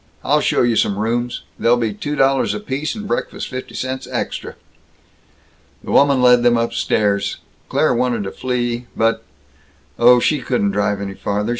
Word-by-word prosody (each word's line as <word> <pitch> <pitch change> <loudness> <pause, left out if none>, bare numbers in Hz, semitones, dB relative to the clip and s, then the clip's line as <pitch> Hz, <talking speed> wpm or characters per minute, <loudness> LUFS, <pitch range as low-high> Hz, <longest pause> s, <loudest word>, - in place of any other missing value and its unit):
I'll - - +2
show - - +2
you 120 -1 +2
some 100 -2 +1
rooms. 120 +3 -2 0.2
They'll 120 +1 +3
be 115 -3 -1
two 145 +8 -4
dollars 135 -1 +2
apiece, 155 -3 -3
and 210 -1 -6
breakfast - - -3
fifty 130 -1 -7
cents 130 0 -4
extra." - - -4 1.3
The - - -6
woman 140 -2 +4
led 125 -1 +6
them 120 -1 +4
upstairs. 105 -3 0 0.3
Claire - - +2
wanted 120 -3 0
to 95 - -5
flee, 120 -1 -2
but 115 0 +1 0.8
Oh, 120 +1 +7
she 150 +4 +1
couldn't 115 -5 0
drive 100 0 0
any 100 -1 -4
farther! 105 +2 -2
120 Hz, 160 wpm, -19 LUFS, 110-130 Hz, 1.3 s, Oh